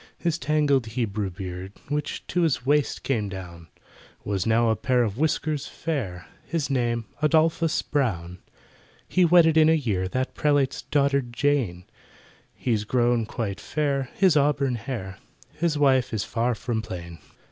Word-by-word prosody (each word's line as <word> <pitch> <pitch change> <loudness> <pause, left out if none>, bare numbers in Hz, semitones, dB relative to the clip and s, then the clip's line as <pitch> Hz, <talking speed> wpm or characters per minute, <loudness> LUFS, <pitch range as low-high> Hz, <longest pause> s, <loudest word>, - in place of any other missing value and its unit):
His 170 -1 -1
tangled 145 -4 +2
Hebrew 110 -3 -2
beard, 95 +1 -7
Which 150 +1 -3
to 180 - -1
his 155 -7 +1
waist 145 +1 +1
came 110 -7 -1
down, 85 -3 -9 0.6
Was 100 0 -1
now 115 +1 +3
a - - +2
pair 125 +2 +1
of 110 +1 -3
whiskers 155 -1 0
fair— 115 - -4 0.2
His 150 -1 -2
name 120 -3 0 0.2
ADOLPHUS 160 +1 +2
BROWN! 90 - -2 0.7
He 185 - +3
wedded 165 -2 +5
in 155 0 +6
a - - +5
year 105 - -1
That 130 +7 -2
prelate's 145 -3 +1
daughter 140 -1 +2
JANE, 120 -7 -1 0.7
He's 110 -5 -1
grown 120 0 +1
quite 110 -4 -4
fair—has 150 +4 +1
auburn 140 -2 +2
hair— 110 -5 -5 0.3
His 160 -2 0
wife 130 -5 +3
is 100 - -1
far 120 +1 -1
from 115 0 -2
plain. 85 -6 -8
125 Hz, 145 wpm, -25 LUFS, 105-150 Hz, 0.7 s, in